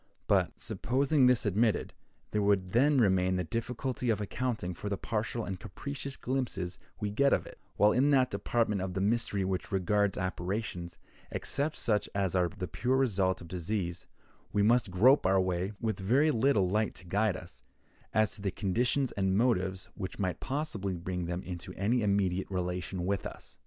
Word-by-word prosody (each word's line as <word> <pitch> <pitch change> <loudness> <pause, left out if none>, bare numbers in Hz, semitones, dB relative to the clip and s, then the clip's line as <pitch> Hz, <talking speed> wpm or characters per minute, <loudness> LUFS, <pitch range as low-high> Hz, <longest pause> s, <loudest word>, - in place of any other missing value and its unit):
But, - - +1
supposing 135 +2 +2
this 125 -1 +3
admitted, 105 +2 +1 0.4
there 105 - +1
would 100 -3 +2
then 140 +6 +4
remain 95 -5 +3
the 90 - 0
difficulty 120 - -3
of 110 -3 +2
accounting 110 -3 -2
for 105 +4 -5
the 100 - -1
partial 110 +2 -2
and 95 -2 -5
capricious 140 +6 -6
glimpses 120 -9 -3 0.2
we 105 -1 -2
get 140 +6 +3
of - - +1
it; - - -12 0.2
while 105 +1 +5
in 135 +5 +3
that 130 -3 +4
department 110 -5 0
of 95 -1 -4
the - - 0
mystery 100 -1 +1
which 95 +1 -2
regards 100 +1 +1
apparitions, 90 -1 -3 0.3
except 145 +2 -1
such 105 -3 0
as 95 -3 0
are 90 -2 +3
the 95 -1 -5
pure 125 - 0
result 95 -9 +1
of 85 - -9
disease, 90 0 -3 0.4
we 100 0 +2
must 115 0 +3
grope 110 +6 +5
our 95 0 +4
way, 95 +2 -1
with 110 -4 -2
very 130 +11 +3
little 115 -6 +3
light 105 +3 0
to 90 - -11
guide 100 +1 +1
us, 85 -10 -12 0.5
as 110 -4 +2
to 100 - -10
the 100 - 0
conditions 120 +8 0
and 95 -1 +1
motives 95 -6 +1
which 95 -2 -6
might 95 -3 -1
possibly 130 -10 -2
bring 90 0 -4
them 90 +1 -3
into 90 -2 -7
any 115 +6 +1
immediate 100 -3 +1
relation 90 -1 -3
with 100 +1 0
us. - - -10
100 Hz, 175 wpm, -31 LUFS, 95-120 Hz, 0.5 s, while